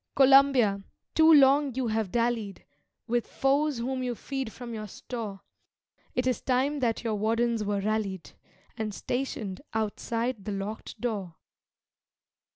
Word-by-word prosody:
Columbia, 270 -7 +5 0.3
too 320 0 +6
long 280 -2 +5
you 260 -1 -1
have 215 -3 -1
dallied 230 -4 -1 0.4
With 240 0 0
foes 280 +1 +1
whom 255 +2 -2
you 250 -1 -2
feed 270 -1 -4
from 240 0 -8
your 215 -1 -5
store; 210 -1 -6 0.7
It 250 - +1
is 255 -3 0
time 270 +3 +1
that 235 -3 0
your 225 -2 -1
wardens 225 +2 +1
were 205 -1 -1
rallied, 200 -4 -2 0.4
And 215 -3 -4
stationed 240 -7 -3
outside 225 +1 -2
the 210 - -3
locked 200 +2 -6
door. 200 -8 -3
235 Hz, 135 wpm, -28 LUFS, 210-260 Hz, 0.7 s, too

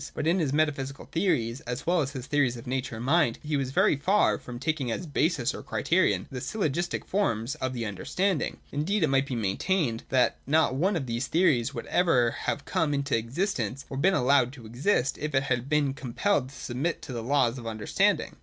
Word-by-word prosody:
But - - -2
in 170 +4 +3
his 150 -6 0
metaphysical 140 -2 -1
theories, 130 - 0
as 125 0 -4
well 175 0 +3
as 140 -1 -3
his 130 -3 -6
theories 135 -5 +1
of 115 - -10
nature 125 -1 -3
and 115 +2 -6
mind, 145 -5 +3
he 150 0 -1
was 135 -2 -1
very 135 - +3
far 195 +9 +2
from 120 -1 -8
taking 140 -1 -1
as 175 - -3
basis, 150 -3 0
or - - -7
criterion, - - +1
the 130 -2 -5
syllogistic 175 - -2
forms 125 - 0
of 130 0 -3
the 120 -2 -3
'understanding.' 170 - -1
Indeed 170 +7 0
it 155 - +3
might 135 0 +2
be 130 - -3
maintained 115 - 0
that 130 -2 +2
not 155 -1 +3
one 180 +9 +1
of 150 -6 -2
these 120 +1 -2
theories 155 -9 +2
would - - -5
ever 130 -10 +3
have 145 - -3
come 165 -6 0
into 140 -1 0
existence, 125 - -2
or 135 - -4
been 190 +7 +3
allowed 130 -2 +3
to 125 -5 -12
exist, 130 - 0
if 150 -1 -3
it 135 - +3
had 125 -1 -1
been 150 -3 +2
com 130 -4 -8
pelled 190 -11 +1
to 135 - -14
submit 140 +7 -3
to 130 - -7
the 120 - -3
laws 130 0 +1
of 115 - -8
understanding. 110 -2 0
135 Hz, 210 wpm, -27 LUFS, 125-160 Hz, -, in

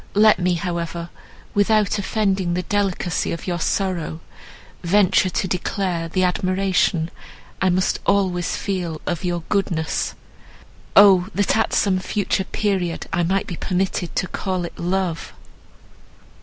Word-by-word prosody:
Let 210 -2 +6
me, 180 0 +1
however, 170 0 -4 0.4
without 210 0 +2
offending 195 -4 0
the 180 - -1
delicacy 195 -3 -1
of 170 - -5
your 175 -2 -2
sorrow, 175 -3 -1 0.6
venture 185 +1 +3
to 185 - -1
declare 180 -2 -2
the 185 +2 0
admiration 185 -2 +1 0.5
I 190 - +3
must 185 +1 +1
always 185 -3 +1
feel 180 -5 -3
of 175 0 -2
your 175 -2 -2
goodness—O! 190 +1 +1
that 205 +1 +2
at 225 - +1
some 190 -2 +2
future 190 0 -1
period 190 -6 -1
I 170 - +2
might 190 +3 +1
be 175 - -6
permitted 185 -1 -2
to 185 - 0
call 185 -2 -2
it - - -10
love!" 175 -2 -2
185 Hz, 130 wpm, -21 LUFS, 175-195 Hz, 0.6 s, Let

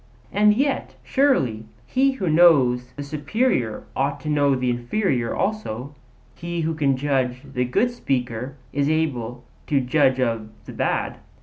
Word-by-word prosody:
'And 210 +1 +5
yet, 275 +3 -1
surely, 135 - +1 0.2
he 270 +1 +2
who 195 -9 -3
knows 140 -7 +4
the 145 - -5
superior 145 - -1
ought 140 +1 0
to 155 - -4
know 145 -2 +3
the 125 -1 0
inferior 120 - -1
also; 145 - -3 0.4
he 170 0 -4
who 160 0 0
can 140 -4 +1
judge 130 -2 -1
of 135 -1 -14
the 125 -1 0
good 215 - +1
speaker 130 - -3 0.2
is 140 +1 +1
able 125 -7 -1 0.2
to 145 - +2
judge 130 0 +2
of 115 -4 -1 0.2
the - - -9
bad. - - -1
140 Hz, 150 wpm, -23 LUFS, 125-170 Hz, 0.4 s, And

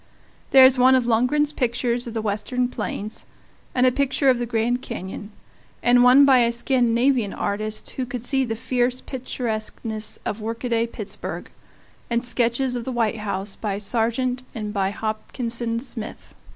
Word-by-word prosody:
There 265 -1 +8
is 260 0 +5
one 260 +1 +6
of 255 -2 +2
Lungren's 250 +6 +2
pictures 245 -1 0
of 230 - -7
the 220 - -2
Western 220 +4 -1
plains; 215 -2 -5 0.5
and 250 0 +4
a 255 - +5
picture 270 +1 +2
of 250 - 0
the 240 - -2
Grand 235 +2 0
Canyon; 205 -3 -7 0.5
and 245 0 +5
one 255 +3 +7
by 265 -2 +6
a 235 -1 +3
Scandinavian 240 -2 +1
artist 215 +1 -3
who 255 -2 -4
could 245 -2 -5
see 265 +1 +2
the 225 -3 -2
fierce 250 +2 0
picturesqueness 220 -4 -4
of 215 - -3
workaday 230 +1 -1
Pittsburgh; 210 -3 -7 0.6
and 235 +1 0
sketches 245 +1 +1
of 240 - -3
the 260 - -4
White 230 -2 0
House 200 -1 -3
by 205 -3 -3
Sargent 235 +4 0
and 210 -2 -4
by 195 -2 +1
Hopkinson 230 +2 -3
Smith. 235 -3 -7
235 Hz, 160 wpm, -23 LUFS, 220-255 Hz, 0.6 s, There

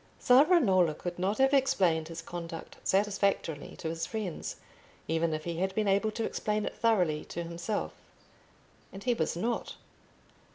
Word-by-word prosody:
Savonarola 245 - +5
could 175 0 -6
not 195 +3 0
have 270 +1 +4
explained 185 - +3
his 165 0 -7
conduct 165 -1 -7
satisfactorily 195 -6 0
to - - -6
his 165 +1 -3
friends, 210 -7 -4 0.5
even 165 +1 +1
if 155 0 -3
he 170 0 -4
had 190 +1 -1
been 215 -1 +1
able 200 +2 +3
to 225 +2 -3
explain 210 0 -1
it - - -3
thoroughly 180 -10 +2
to 170 - -5
himself. 170 +5 -3 1.0
And 195 - -9
he 250 - +2
was 165 -6 -1
not. 230 +7 -2
190 Hz, 155 wpm, -30 LUFS, 165-215 Hz, 1.0 s, Savonarola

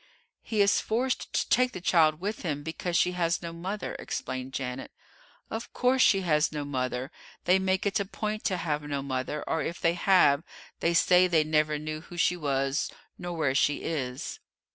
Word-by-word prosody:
"He 215 -2 0
is 200 0 +4
forced 250 +4 -1
to - - 0
take 250 0 +3
the - - -5
child 160 -3 +3
with 205 +4 -3
him, 145 -5 -3
because 170 +2 -2
she 180 - +3
has 170 -1 0
no 170 0 -5
mother," 185 +5 -4
explained 130 0 -4
Janet. 130 -1 -4 0.6
"Of 225 +1 -5
course 255 +1 +2
she 195 -5 +5
has 155 -4 +2
no 150 -2 -4
mother; 130 0 -3 0.3
they 185 +2 +4
make 190 +1 0
it 200 +1 +1
a 200 - -1
point 215 +2 -4
to 190 -4 +1
have 150 -4 -1
no 145 -2 -3
mother, 135 +2 -3
or, 160 - -1
if 170 - -4
they 165 - +2
have, 175 -5 +4 0.4
they 170 0 +1
say 180 +1 +5
they 165 -3 +3
never 155 0 +1
knew 155 +1 -5
who 175 - -11
she 180 - +3
was 135 -3 -1 0.3
nor 175 -1 -5
where 145 -5 +1
she 145 +2 +1
is." 130 -6 -4
165 Hz, 190 wpm, -28 LUFS, 145-185 Hz, 0.6 s, she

